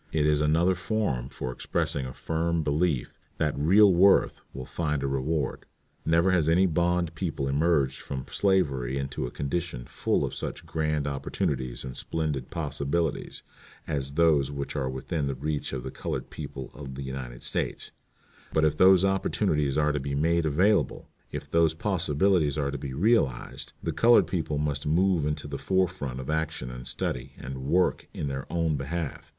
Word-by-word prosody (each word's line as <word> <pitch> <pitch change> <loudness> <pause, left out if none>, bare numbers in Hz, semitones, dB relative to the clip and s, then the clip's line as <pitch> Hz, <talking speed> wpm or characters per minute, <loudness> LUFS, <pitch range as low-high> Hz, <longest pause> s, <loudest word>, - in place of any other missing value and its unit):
It 75 -2 +1
is 75 -1 +3
another 80 +5 +3
form 85 - -1
for 65 - -5
expressing 65 +1 -2
a 65 - -7
firm 80 0 -1
belief 75 -2 0 0.2
that 75 -2 0
real 95 +7 +6
worth 95 +3 +4
will 65 -1 -7
find 75 -3 -2
a - - 0
reward. 70 +3 -1 0.4
Never 85 +3 +4
has 85 -4 +3
any 90 +4 +5
bond 85 -1 +1
people 75 -5 -2
emerged 70 -1 +2
from 65 -2 -5
slavery 70 -10 +1
into 70 -2 -3
a - - -5
condition 70 -2 -3
full - - 0
of - - -5
such - - -5
grand 75 -2 -1
opportunities 65 -2 -2
and 65 -1 -6
splendid 75 -5 -3
possibilities 75 +1 -2 0.4
as 70 -1 -3
those 75 -4 +3
which 70 0 -4
are 65 -3 -1
within 70 +3 -2
the 70 - -2
reach 75 +2 -2
of 65 -2 -4
the 65 - -5
colored - - -4
people 70 -3 -7
of 65 0 -8
the 70 - -5
United 65 -2 -6
States; - - -2 0.6
but 80 0 +3
if 75 -1 +2
those 95 +1 +6
opportunities 75 -7 +1
are 75 0 +3
to 75 - -1
be 70 0 -3
made 80 +2 +2
available, 95 +8 +2 0.2
if - - -6
those 85 -1 +3
possibilities 85 -3 +1
are 70 -2 0
to 70 - -4
be 65 -2 -5
realized, 80 - +1
the - - -1
colored 120 +1 +6
people 80 -4 -2
must 75 -1 -1
move 85 -1 +3
into 75 -1 -3
the 70 -1 -5
fore 95 -1 +2
front 70 -8 -5
of 65 - -6
action 80 -4 -2
and 60 +1 -8
study 65 - -3
and 65 +1 -6
work 90 +7 +1
in - - -2
their 65 0 -5
own 85 -2 +1
behalf. 75 +2 -4
75 Hz, 175 wpm, -27 LUFS, 70-85 Hz, 0.6 s, real